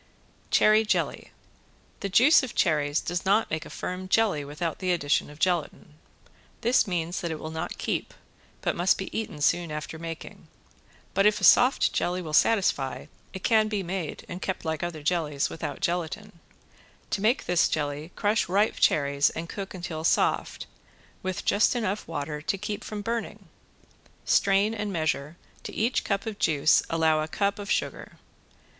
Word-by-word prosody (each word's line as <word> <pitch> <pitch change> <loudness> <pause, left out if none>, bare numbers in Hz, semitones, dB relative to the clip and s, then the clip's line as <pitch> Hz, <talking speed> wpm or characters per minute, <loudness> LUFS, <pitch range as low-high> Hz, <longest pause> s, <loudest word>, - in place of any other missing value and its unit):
~CHERRY 215 +1 +5
JELLY~ 215 - -1 0.7
The 200 - -3
juice 255 - +6
of 260 -4 -6
cherries 150 -4 +2
does 175 0 -3
not 205 +4 +2
make 155 0 -3
a - - -12
firm 185 +1 -5
jelly 195 -7 +2
without 150 +3 -4
the 185 -1 0
addition 145 -5 +1
of 150 - -13
gelatin. 170 -3 -1 0.7
This 240 -1 +3
means 175 -1 -2
that 170 - -3
it 160 - -3
will 155 - -6
not 160 0 -4
keep, - - -2 0.5
but - - -1
must 175 +2 +3
be 190 - -6
eaten 210 -9 -4
soon 170 +2 +2
after 150 +1 -6
making. 165 -1 -8 0.7
But 195 +2 +4
if 210 0 +2
a - - -9
soft 250 +9 +5
jelly 180 +1 0
will 160 -4 -6
satisfy 170 -9 +2 0.3
it 190 - -8
can 220 -2 +4
be 210 -2 -2
made, 175 -2 -4
and 180 +2 -7
kept 190 - -3
like 160 -1 -2
other 170 -3 -4
jellies, 150 -4 0
without 165 - -5
gelatin. 175 +3 -3 0.7
To 195 - -1
make 230 +6 +2
this 175 -1 +3
jelly 150 +2 -3
crush 210 -2 +1
ripe 200 +4 +2
cherries 140 -1 +3
and 165 +1 -6
cook 195 +2 -6
until 170 -3 -5
soft, - - +1 0.6
with 185 -1 -4
just 210 +5 +3
enough 215 -3 -2
water 150 -2 -4
to 195 +6 -1
keep 210 +1 -5
from 210 -1 -6
burning. 215 -5 -4 0.8
Strain 200 +2 +3
and 210 -2 -3
measure, 155 -2 -2 0.2
to - - -7
each 230 +4 +1
cup 200 -1 -1
of 220 -2 -5
juice 150 -1 +4
allow 160 -1 +2
a 155 - -2
cup 200 +5 -1
of 205 0 -7
sugar. - - -2
180 Hz, 170 wpm, -27 LUFS, 155-205 Hz, 0.8 s, juice